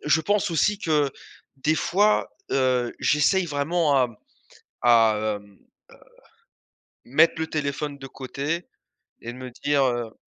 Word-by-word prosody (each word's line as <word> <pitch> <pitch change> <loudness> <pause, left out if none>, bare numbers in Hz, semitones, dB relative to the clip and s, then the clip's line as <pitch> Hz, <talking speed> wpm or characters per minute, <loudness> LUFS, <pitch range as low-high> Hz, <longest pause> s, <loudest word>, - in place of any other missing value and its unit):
je 155 +2 +3
pense 205 +1 +1
aussi 200 +5 +1
que 150 -6 +1 0.5
des 155 +4 +1
fois, 205 +6 +2 0.2
heu, 125 -2 +1
j'essaye 165 +6 +3
vraiment 150 +1 0
à 130 - +4
m 120 - -14 0.7
à, 115 -2 +5 0.3
hem, 100 -1 -20
heu, - - -27 1.5
mettre 145 +7 +4
le 160 - -1
téléphone 145 -1 -3
de 135 - -8
côté 140 +6 -4 0.6
et 120 - -6
de - - -12
me 130 0 -8
dire, 140 +3 +1
heu 120 -3 -2
145 Hz, 140 wpm, -24 LUFS, 125-165 Hz, 1.5 s, à